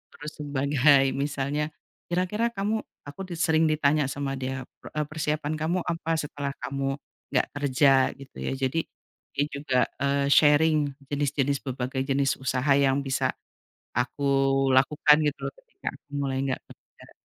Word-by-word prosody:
terus 150 +1 -7
sebagai 140 -1 +3
misalnya, 145 +1 -1 0.4
"Kira-kira 185 +6 0
kamu?"Aku 200 -6 -4
di 175 - -5
sering 160 -2 +3
ditanya 150 -2 +2
sama 135 0 -3
dia, 130 0 -3 0.2
"Pre - - -12
eee, 150 - +1
persiapan 155 0 -2
kamu 170 +4 0
apa 165 -1 -1
setelah 145 -1 -4
kamu 135 +1 -2 0.4
nggak - - +2
kerja?" 135 -1 +3
Gitu 135 -1 -14
ya. - - -2
Jadi 135 +4 0 0.6
dia 145 - +2
juga, 140 -3 0 0.2
eee, 140 0 +1
sharing 155 +2 +5 0.3
jenis-jenis 140 -1 0
berbagai 130 0 -2
jenis 135 0 +2
usaha 130 +2 0
yang 140 0 +3
bisa 135 -1 0 0.7
aku 125 +3 -1 0.5
lakukan 150 +3 +5
gitu 145 - -2
loh - - -4
ketika - - -16
aku - - -18
mulai 135 -2 -1
nggak 130 - -2
kerja. - - -18
140 Hz, 145 wpm, -26 LUFS, 135-155 Hz, 0.7 s, sharing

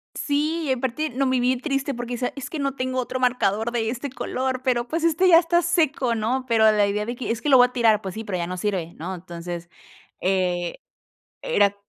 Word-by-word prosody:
Sí, 305 +1 -1
aparte 260 +4 -1
no 265 +3 -1
me 260 -1 +1
vi 250 +1 +2
triste 275 +1 -2
porque 240 0 -5
esa 245 +1 -2
es 275 - -6
que 320 - -5
no 275 -1 -1
tengo 255 -1 -2
otro 255 +1 -4
marcador 235 -3 +1
de 225 -2 0
este 260 +4 -4
color, 260 0 -3
pero 245 -2 +1
pues, 325 +3 -2
este 335 +3 +3
ya 335 -2 +8
está 345 +1 +2
seco, 310 -8 +1
¿no?, 240 +4 -1
pero 220 -2 +5
la 210 -1 +3
idea 210 +1 -1
de 240 +2 -4
que, 250 - -3
es 230 - -3
que 295 - -1
lo 265 - +8
voy 245 0 +7
a 250 - -18
tirar. 225 -4 +3
Pues 190 -3 -6
sí, 220 - -5
pero 190 -4 -3
ya 170 - -2
no 180 - -4
sirve, 180 -3 -2
¿no?, 180 +4 -5
entonces, 175 -1 -7 0.5
eh, 180 -2 0 0.7
era 205 - +2
245 Hz, 225 wpm, -23 LUFS, 210-275 Hz, 0.7 s, ya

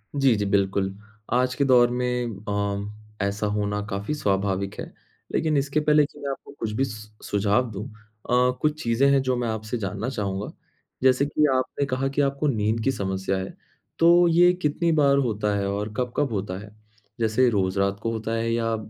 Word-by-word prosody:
जी, 135 -4 +4
जी, 100 0 -1
बिल्कुल। 95 -1 0 0.4
आज 125 +1 +2
के 140 - +1
दौर 125 -2 +5
में 125 -2 -1
अ, 100 +1 -3
ऐसा 100 +1 -1
होना 105 0 -1
काफ़ी 100 +9 -3
स्वभाविक 100 -5 -1
है। - - -4 0.5
लेकिन 155 -2 +1
इसके 140 +2 +1
पहले 150 0 +4
कि - - -14
मैं 140 - -4
आपको - - -9
कुछ 110 -1 -2
भी 135 +4 +1
सु 110 -2 -11
सुझाव 105 +4 +1
दूँ। 105 +3 -5
अ, 105 - -16 0.7
कुछ 155 0 0
चीज़ें 115 +4 +3
हैं 140 -1 +4
जो 130 -1 0
मैं 120 -1 -1
आपसे 110 +1 -3
जानना 105 +3 -3
चाहूँगा। 100 -4 -3 0.5
जैसे 130 +1 +4
कि 150 +1 +2
आपने 130 +2 -1
कहा 135 0 -1
कि 140 +1 0
आपको 140 +1 0
नींद 110 -3 0
की 135 - +2
समस्या 95 -3 -2
है 95 0 -5 0.4
तो 175 +1 +6
ये 175 +2 +5
कितनी 160 +2 +1
बार 140 -3 +4
होता 105 -5 0
है? 100 0 -1
और 105 +2 -3
कब-कब 125 +2 -1
होता 95 -2 -3
है, 105 0 -12 0.4
जैसे 115 +3 +3
रोज़ 95 -3 0
रात 100 0 0
को 115 - 0
होता 110 0 -4
है 115 0 -1
या 115 -1 0
115 Hz, 190 wpm, -24 LUFS, 100-135 Hz, 0.7 s, तो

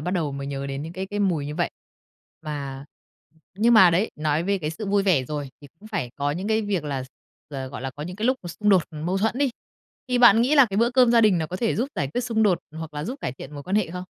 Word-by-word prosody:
bắt 175 +4 -3
đầu 165 -6 -1
mới 140 0 -5
nhớ 140 0 -4
đến 140 +1 -4
những 165 +2 -7
cái 190 +2 -5
cái 205 +1 -4
mùi 165 -8 0
như 150 - -5
vậy. - - -1 0.7
Mà 140 -3 -5 0.7
nhưng 235 +3 +5
mà 190 -5 +8
đấy, 185 +7 +1
nói 155 +1 0
về 200 +2 0
cái 155 -3 -3
sự 205 +6 -6
vui 200 0 +2
vẻ 175 -10 +2
rồi, 145 0 -5
thì 145 - -13
cũng 215 - -13
phải 190 - -3
có 145 0 0
những 185 +6 -4
cái 220 0 +2
việc 195 -6 -2
là 140 -3 -3
x - - -16 0.4
ờ, 135 -2 -5
gọi 135 - -8
là, 135 - -3
có 145 - -8
những 180 +4 -6
cái 215 +3 -1
lúc 260 - +3
mà 175 - -7
xung 210 +5 -2
đột 185 -4 +5
mâu 165 +5 -2
thuẫn 220 +5 0
đi. 280 -2 +2 0.6
Thì 250 -1 +1
bạn 230 -2 +7
nghĩ 275 +5 +2
là 275 -3 +7
cái 195 - -2
bữa 235 +2 +3
cơm 250 -1 +5
gia 230 - +6
đình 210 -5 +4
nó 160 - -1
có 180 - -5
thể 225 +2 0
giúp 245 +5 0
giải 140 - -1
quyết 245 - +1
xung 230 -3 0
đột, 190 -5 +3 0.2
hoặc 160 -2 -7
là 150 +1 -4
giúp 265 +7 -6
cải - - -3
thiện 135 +2 -10
mối 145 - -7
quan 190 +6 -1
hệ 195 -6 0
không? 180 +1 -5
180 Hz, 300 wpm, -24 LUFS, 145-215 Hz, 0.7 s, mà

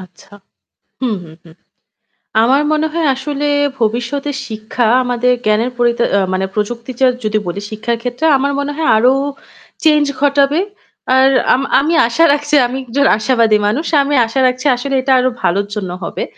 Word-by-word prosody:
আচ্ছা। 190 +2 -16 0.7
হু, 255 - 0
হু, 160 - -14
হু। 170 - -17 0.9
আমার 265 +5 +3
মনে 310 +1 0
হয় 330 -2 0
আসলে 285 +2 -4 0.3
ভবিষ্যতে 240 +6 -2 0.2
শিক্ষা 220 +2 -3 0.2
আমাদের 245 0 +1
জ্ঞানের 215 +4 +1
পরিতা 240 -1 +1
আ - - +3
মানে 190 +1 -1
প্রযুক্তির 230 +3 -4
যে 260 - +5 0.2
যদি 215 0 0
বলি 175 +3 -4
শিক্ষার 225 +2 -3
ক্ষেত্রে 245 +5 -3
আমার 280 +1 -1
মনে 285 +1 -2
হয় 320 +1 -2
আরও 250 +4 +4 0.7
change 300 -2 +3
ঘটাবে। 285 +2 +2 0.6
আর 265 +1 +5 0.2
আম 255 - +1 0.2
আমি 305 +5 0
আশা 245 +8 +1
রাখছি 295 +1 -1
আমি 260 +2 -5
একজন 275 +4 0
আশাবাদী 230 -2 +2
মানুষ। 270 +10 -1 0.2
আমি 285 +1 -1
আশা 225 +4 -3
রাখছি 255 +2 -3
আসলে 270 +3 -3
এটা 265 +1 -1
আরও 255 +1 +1
ভালোর 200 +3 0
জন্য 190 -4 -4
হবে। - - -4
250 Hz, 165 wpm, -15 LUFS, 225-280 Hz, 0.9 s, যে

